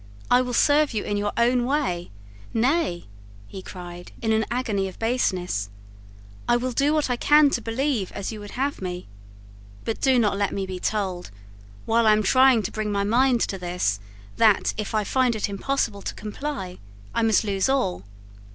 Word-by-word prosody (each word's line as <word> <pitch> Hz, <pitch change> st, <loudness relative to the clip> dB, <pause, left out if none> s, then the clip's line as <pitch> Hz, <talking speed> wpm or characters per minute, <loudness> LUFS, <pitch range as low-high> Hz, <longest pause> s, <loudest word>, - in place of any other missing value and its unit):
I 245 Hz, -, +6 dB
will 250 Hz, -1 st, -3 dB
serve 290 Hz, -2 st, +3 dB
you 210 Hz, -, -1 dB
in 205 Hz, -, -2 dB
your 205 Hz, 0 st, -1 dB
own 245 Hz, +1 st, +3 dB
way. 245 Hz, -11 st, -1 dB, 0.5 s
Nay," 240 Hz, -, +1 dB, 0.4 s
he 190 Hz, -, -9 dB
cried, 175 Hz, -1 st, -9 dB
in 225 Hz, -2 st, 0 dB
an 220 Hz, 0 st, +2 dB
agony 220 Hz, -6 st, -1 dB
of 185 Hz, -, -10 dB
baseness, 185 Hz, -, -1 dB, 0.8 s
"I 240 Hz, -, +5 dB
will 255 Hz, +1 st, -2 dB
do 280 Hz, +4 st, +2 dB
what 305 Hz, -4 st, +1 dB
I -, -, +2 dB
can 295 Hz, +3 st, +5 dB
to 240 Hz, -, -1 dB
believe 230 Hz, -3 st, -1 dB
as 200 Hz, +1 st, -4 dB
you 215 Hz, -, -7 dB
would 205 Hz, +2 st, -9 dB
have 275 Hz, -1 st, -1 dB
me. 180 Hz, -1 st, -5 dB, 0.8 s
But 225 Hz, -, -3 dB
do 265 Hz, -2 st, +4 dB
not 205 Hz, -4 st, +2 dB
let 200 Hz, -2 st, 0 dB
me 195 Hz, -, -2 dB
be 185 Hz, -1 st, -6 dB
told, 190 Hz, -3 st, -2 dB, 0.6 s
while 230 Hz, 0 st, +3 dB
I 215 Hz, -, +7 dB
am 215 Hz, 0 st, +2 dB
trying 255 Hz, +1 st, +5 dB
to 200 Hz, -, -3 dB
bring 215 Hz, -1 st, -3 dB
my 200 Hz, -1 st, 0 dB
mind 240 Hz, +3 st, +3 dB
to 195 Hz, -, -1 dB
this, 175 Hz, -, -1 dB, 0.4 s
that, 215 Hz, -3 st, +4 dB
if 215 Hz, 0 st, -4 dB
I 215 Hz, -, +2 dB
find 250 Hz, +2 st, +1 dB
it 215 Hz, -, -1 dB
impossible 205 Hz, 0 st, -2 dB
to -, -, -5 dB
comply, 210 Hz, -3 st, -5 dB, 0.3 s
I -, -, +1 dB
must 225 Hz, 0 st, +3 dB
lose 200 Hz, +2 st, 0 dB
all. 90 Hz, -, 0 dB
220 Hz, 190 wpm, -24 LUFS, 195-255 Hz, 0.8 s, I